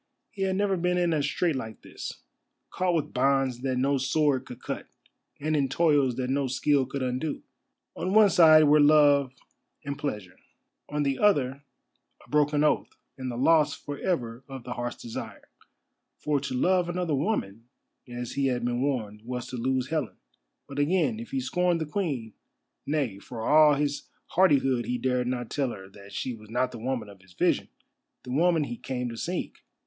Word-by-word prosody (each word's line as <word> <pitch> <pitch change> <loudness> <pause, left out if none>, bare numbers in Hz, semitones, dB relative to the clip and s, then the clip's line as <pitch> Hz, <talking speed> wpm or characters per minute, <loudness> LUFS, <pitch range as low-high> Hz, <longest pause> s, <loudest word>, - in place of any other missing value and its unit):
He 205 - -8
had 190 -1 +1
never 195 -1 +1
been 180 +1 +1
in 175 -2 +2
a 155 - +1
strait 155 +3 0
like 110 -4 -6
this; - - -8 0.5
caught 180 -1 0
with 155 - -2
bonds 135 -1 +2
that 130 0 -1
no 135 +2 +1
sword 135 0 +1
could 125 - -9
cut, - - -5 0.5
and 155 +2 0
in 140 -3 +1
toils 145 -4 +2
that 130 0 -2
no 140 0 +1
skill 135 +1 +1
could 135 0 -4
undo. 130 +4 -3 0.5
On 185 - -2
one 210 -1 +6
side 155 -2 +7
were 150 0 +5
love 145 -2 +5 0.5
and 140 0 -4
pleasure—on 120 +5 -6
the 140 -2 -1
other 140 -9 +2 0.6
a - - -25
broken 150 0 +3
oath, 150 - +2 0.3
and 130 -2 -5
the 120 - -5
loss 150 +1 +4
for 145 -1 -7
ever 125 -9 -2
of 135 -2 -8
the 125 - -5
Heart's 120 0 -5
Desire. 115 - -8 0.7
For 150 -1 0
to 135 -1 -4
love 180 +5 +2
another 175 -2 -1
woman, 125 - -2 0.4
as 120 -1 -6
he 140 -1 0
had 125 -2 -1
been 120 0 -1
warned, 110 -7 -2
was 125 0 -4
to 125 - -6
lose 130 +1 -1
Helen. 155 -3 -2 0.5
But 140 0 -6
again, 145 -7 +1
if 115 - -8
he 135 - -1
scorned 175 +6 +1
the 160 - -2
Queen—nay, 140 - -4
for 115 +1 -6
all 150 -1 +6
his 145 0 -2 0.2
hardihood 135 -8 +3
he 125 - -1
dared 125 0 0
not 125 -2 -3
tell 140 -3 0
her 95 -4 -8
that 100 0 -14
she 130 - -3
was 110 -2 -13
not 125 +2 0
the 120 - -8
woman 125 -1 -3
of 100 -2 -14
his 95 -1 -20
vision, - - +1 0.5
the 125 - -8
woman 165 +3 +3
he 120 -4 -5
came 125 -2 -4
to 115 - -7
seek. 175 +9 -4
135 Hz, 185 wpm, -27 LUFS, 125-155 Hz, 0.7 s, side